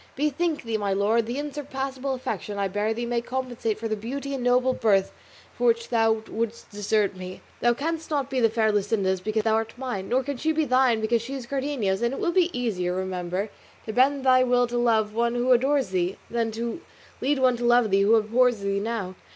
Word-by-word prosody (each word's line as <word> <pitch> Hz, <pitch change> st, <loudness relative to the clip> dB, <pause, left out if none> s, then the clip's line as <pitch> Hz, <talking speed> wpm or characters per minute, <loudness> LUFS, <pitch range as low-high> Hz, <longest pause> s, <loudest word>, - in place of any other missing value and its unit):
Bethink 300 Hz, +3 st, -1 dB
thee, 225 Hz, -2 st, -1 dB
my 200 Hz, -1 st, -1 dB
lord, 220 Hz, +3 st, +1 dB
the 240 Hz, +3 st, -3 dB
unsurpassable 270 Hz, -2 st, -4 dB
affection 250 Hz, -5 st, -4 dB
I 200 Hz, -1 st, 0 dB
bear 205 Hz, +3 st, -1 dB
thee 235 Hz, +2 st, -2 dB
may 235 Hz, 0 st, -1 dB
compensate 245 Hz, -3 st, -3 dB
for 225 Hz, -, -4 dB
the 215 Hz, -, -1 dB
beauty 275 Hz, +6 st, -5 dB
and 265 Hz, -3 st, -3 dB
noble 250 Hz, +1 st, +3 dB
birth 200 Hz, -5 st, +2 dB, 0.4 s
for -, -, 0 dB
which 465 Hz, 0 st, +1 dB
thou 225 Hz, -1 st, +2 dB
wouldst 230 Hz, +1 st, -4 dB
desert 205 Hz, -1 st, 0 dB
me. 185 Hz, 0 st, -8 dB, 0.2 s
Thou 240 Hz, 0 st, +3 dB
canst 320 Hz, +4 st, -3 dB
not 285 Hz, -4 st, 0 dB
be 265 Hz, -, -1 dB
the 225 Hz, -2 st, +4 dB
fair 220 Hz, -1 st, +2 dB
Luscinda's 200 Hz, -2 st, 0 dB
because 215 Hz, +2 st, -1 dB
thou 220 Hz, 0 st, +2 dB
art 225 Hz, 0 st, -1 dB
mine, 245 Hz, -7 st, -4 dB
nor 260 Hz, +2 st, +2 dB
can 280 Hz, 0 st, -4 dB
she 315 Hz, +5 st, 0 dB
be 315 Hz, 0 st, +1 dB
thine 255 Hz, -3 st, +3 dB
because 225 Hz, +1 st, +1 dB
she 260 Hz, +4 st, -6 dB
is 260 Hz, -3 st, -6 dB
Cardenio's; 260 Hz, -7 st, -1 dB
and 235 Hz, +3 st, 0 dB
it -, -, -6 dB
will 360 Hz, -5 st, +1 dB
be 355 Hz, 0 st, +3 dB
easier, 190 Hz, -, -2 dB
remember, 185 Hz, +2 st, -3 dB, 0.3 s
to 220 Hz, -, -5 dB
bend 270 Hz, +2 st, +3 dB
thy 255 Hz, -1 st, +6 dB
will 245 Hz, -1 st, +3 dB
to 240 Hz, 0 st, -3 dB
love 220 Hz, -3 st, +2 dB
one 235 Hz, +1 st, 0 dB
who 245 Hz, +1 st, +1 dB
adores 270 Hz, +1 st, +3 dB
thee, 185 Hz, 0 st, -1 dB
than 230 Hz, -1 st, 0 dB
to 235 Hz, +7 st, -4 dB, 0.4 s
lead 285 Hz, +2 st, +1 dB
one 255 Hz, -1 st, +3 dB
to 240 Hz, -, -5 dB
love 240 Hz, -3 st, +4 dB
thee 195 Hz, 0 st, +4 dB
who 210 Hz, +3 st, +5 dB
abhors 230 Hz, +1 st, +2 dB
thee 200 Hz, 0 st, 0 dB
now. 205 Hz, -3 st, -3 dB
235 Hz, 220 wpm, -25 LUFS, 215-260 Hz, 0.4 s, thy